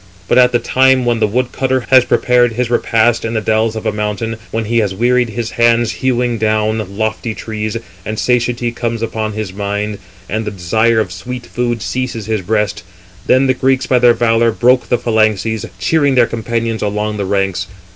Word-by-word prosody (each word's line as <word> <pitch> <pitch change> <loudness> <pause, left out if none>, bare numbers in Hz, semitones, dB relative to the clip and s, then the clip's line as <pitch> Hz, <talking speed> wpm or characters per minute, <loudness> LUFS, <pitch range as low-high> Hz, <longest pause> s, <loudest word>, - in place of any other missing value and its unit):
But - - +4
at 125 0 +5
the 120 - +3
time 130 +1 +2
when 120 -1 +1
the 110 - +2
wood 125 +4 -1
cutter 130 -1 0
366 - - -15
has 130 -1 +6
prepared 120 -1 +3
his 120 +1 -2
repast 115 -1 +2
in 115 0 -3
the - - +2
dells 110 +1 0
of 110 - -6
a - - +1
mountain, 105 +2 -3
when 115 0 -2
he 115 +2 +1
has 100 -4 -1
wearied 120 +2 +2
his 115 +1 -4
hands 120 0 +2
hewing 125 -2 -1
down 110 -2 -1
lofty 110 +1 -2
trees, 110 0 -4 0.3
and 110 +2 -5
satiety 120 +1 0
comes 115 -1 -3
upon 110 -1 -3
his 105 -3 -5
mind, 105 +1 -3 0.3
and 110 +2 -2
the 105 - -3
desire 110 +5 +1
of 105 -5 -1
sweet 120 +7 -7
food 120 -2 -2
seizes 125 -4 -3
his 110 -2 -1
breast; 105 +1 -1 0.5
then 130 +1 +4
the 130 - +3
Greeks, 130 0 +1
by 125 - +2
their 120 -1 +5
valour, 115 0 +2
broke 125 +3 +2
the 125 - +3
phalanxes, 110 -2 0
cheering 145 +4 +1
their 125 -2 +5
companions 115 0 -3
along 105 +1 -2
the 100 - -2
ranks. 95 -2 -1
115 Hz, 195 wpm, -15 LUFS, 110-120 Hz, 0.5 s, has